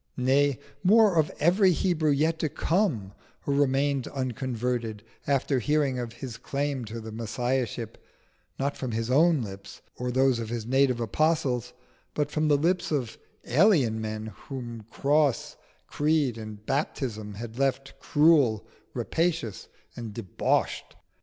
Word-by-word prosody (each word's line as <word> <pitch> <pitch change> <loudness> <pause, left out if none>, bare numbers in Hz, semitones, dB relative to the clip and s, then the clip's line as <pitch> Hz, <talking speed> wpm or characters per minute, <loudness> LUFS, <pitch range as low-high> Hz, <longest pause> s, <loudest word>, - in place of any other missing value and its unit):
nay, 135 +1 +3 0.3
more, 210 0 +5
of 155 -2 +3
every 185 +5 +4
Hebrew 165 -3 +1
yet 155 +3 +2
to 155 - 0
come 155 - 0 0.3
who 140 - -1
remained 140 -1 +1
unconverted 125 -4 -3 0.2
after 140 -1 +1
hearing 145 -2 +1
of 120 -2 -5
His 115 -1 -7
claim 140 0 -2
to 115 +2 -6
the 110 0 -8
Messiahship, 115 0 -3 0.5
not 140 +1 -1
from 130 -3 -4
His 115 +2 -2
own 155 0 +4
lips 100 -2 -10
or 125 0 -3
those 130 -1 +2
of 115 -1 -4
His 115 -2 -3
native 130 0 +2
apostles, 125 0 0 0.4
but 150 -1 -1
from 155 0 +1
the 145 -1 +4
lips 175 +4 0
of 130 -7 -2 0.3
alien 135 - +3
men 110 0 -5
whom 120 -5 -7
cross, 145 +1 +1 0.3
creed, 150 -5 +1
and 110 -2 -9
baptism 115 -7 -2
had 115 +3 -7
left 135 0 0
cruel, 145 -8 +3 0.3
rapacious, 165 - -1 0.3
and 115 -4 -7
debauched? 105 -6 -1
130 Hz, 135 wpm, -27 LUFS, 115-150 Hz, 0.5 s, more